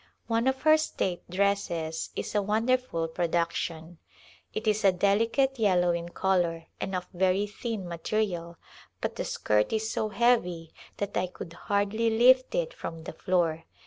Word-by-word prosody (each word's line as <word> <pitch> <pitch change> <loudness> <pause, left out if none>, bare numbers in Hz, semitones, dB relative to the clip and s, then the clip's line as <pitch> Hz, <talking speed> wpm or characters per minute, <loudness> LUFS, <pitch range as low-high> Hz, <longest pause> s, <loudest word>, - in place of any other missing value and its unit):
One 230 +2 +1
of 265 0 0
her 310 0 +7
state 185 - -2
dresses 180 -4 -1
is - - -4
a 210 - +2
wonderful 220 -4 0
production. 170 0 -2 0.5
It 215 - -4
is 215 -1 +1
a 195 - +6
deli 200 +4 +2
cate 270 +2 +1
yellow 180 -5 +3
in 170 0 -3
color 175 -3 0
and 190 - -3
of 180 0 -3
very 190 +2 +2
thin 210 -2 -5
material, 170 -1 -2 0.4
but - - -3
the - - -3
skirt 105 0 +1
is 220 0 -1
so 215 - -1
heavy 180 -9 +1 0.2
that 205 0 -3
I 185 - +1
could 175 -1 -9
hardly 205 +5 0
lift 255 - +5
it - - -1
from 165 -1 -7
the - - -7
floor. 165 -2 0
195 Hz, 160 wpm, -28 LUFS, 170-225 Hz, 0.5 s, her